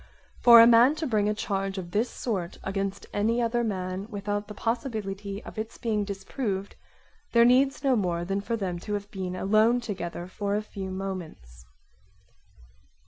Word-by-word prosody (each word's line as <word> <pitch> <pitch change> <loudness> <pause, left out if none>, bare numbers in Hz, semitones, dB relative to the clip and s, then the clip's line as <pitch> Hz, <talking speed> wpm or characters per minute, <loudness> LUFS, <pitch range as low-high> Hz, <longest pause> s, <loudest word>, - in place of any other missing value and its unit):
For 235 -1 +9
a 230 - +10
man 240 +5 +6
to 315 0 -3
bring 210 -6 +1
a - - +1
charge 195 -2 -2
of 175 -2 -6
this 220 +5 +1
sort 190 -8 -4
against 195 0 -3
any 225 +3 +1
other 240 0 +1
man 190 -2 -3
without 205 -1 -3
the 210 - -9
possibility 210 -4 -3
of - - -8
its 220 +1 -5
being 215 -3 -1
disproved 200 0 -4 0.6
there 235 0 +6
needs 265 +3 +3
no 270 -2 +3
more 175 -5 -1
than 195 +2 -1
for 230 +3 -2
them 180 -4 -3
to 210 +3 -3
have 205 0 -6
been 185 -2 -4
alone 215 +6 +3
together 180 -7 -5
for 200 +2 -3
a 210 - -1
few 195 -2 -7
moments. 170 - -7
205 Hz, 170 wpm, -27 LUFS, 190-230 Hz, 0.6 s, a